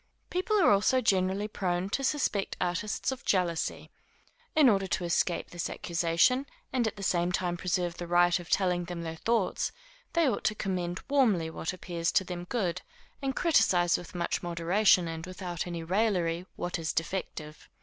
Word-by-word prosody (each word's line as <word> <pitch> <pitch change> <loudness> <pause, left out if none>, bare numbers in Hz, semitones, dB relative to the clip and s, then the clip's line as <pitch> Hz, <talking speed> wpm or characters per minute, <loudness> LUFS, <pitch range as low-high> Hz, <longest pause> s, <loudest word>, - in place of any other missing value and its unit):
People 375 +4 +1
are 355 - +5
also 205 +6 +4
generally 195 -2 +1
prone 180 -3 -1
to 275 - -1
suspect 260 -8 0
artists 180 +7 -1
of 265 - -6
jealousy. 175 -4 0 0.6
In 305 -3 +6
order 195 -4 +3
to 185 0 -1
escape 170 0 0
this 175 -1 -3
accusation, 170 +11 +1 0.3
and 245 -3 +2
at 220 - -3
the 200 - -8
same 175 -1 +1
time 180 -1 -1
preserve 175 -1 -1
the 175 - -5
right 175 +1 +4
of 175 - -10
telling 180 -2 +1
their 170 -2 -5
thoughts, 225 0 0 0.4
they 335 -3 +3
ought 255 - -1
to 215 - +2
commend 180 -3 -2
warmly 215 -13 +2
what 165 - -3
appears 175 -2 -2
to - - +4
them 175 -1 -6
good, 185 -5 -1 0.4
and 270 -1 -2
criticise 195 - +3
with 175 - -6
much 170 -1 -1
moderation 175 +2 +3
and 165 +1 -5
without 180 -2 -5
any 170 -1 -4
raillery 180 -2 0
what 175 0 -3
is 160 -1 -2
defective. 165 -3 -4
180 Hz, 170 wpm, -29 LUFS, 175-210 Hz, 0.6 s, In